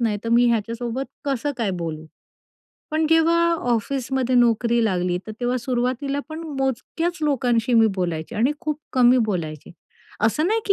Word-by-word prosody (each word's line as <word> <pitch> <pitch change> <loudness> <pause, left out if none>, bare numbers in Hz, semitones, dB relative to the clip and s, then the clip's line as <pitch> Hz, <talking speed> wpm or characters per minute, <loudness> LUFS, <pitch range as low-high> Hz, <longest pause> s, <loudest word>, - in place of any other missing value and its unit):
नाही, 225 -3 +1
तर - - -2
मी 240 +1 +4
ह्याच्यासोबत 235 +3 -2 0.2
कसं 280 +1 -1
काय 215 -4 0
बोलू?" 160 -1 -5 0.8
पण 315 0 +1
जेव्हा 330 +1 +4 0.3
ऑफिसमध्ये 255 +2 -1
नोकरी 235 0 +3
लागली 180 -3 0
तर 215 - -6
तेव्हा 245 +1 0
सुरुवातीला 255 +3 -1
पण 315 +1 -6 0.2
मोजक्याच 325 +7 -2
लोकांशी 245 -4 +1
मी 225 -1 +6
बोलायचे 170 -2 -3
आणि 250 +7 +2
खूप 305 -3 -2
कमी 250 0 +5
बोलायचे. 170 - -3 0.5
असं 300 +9 +2
नाही 450 +1 +1
की 400 - +5
245 Hz, 150 wpm, -22 LUFS, 225-275 Hz, 0.8 s, मी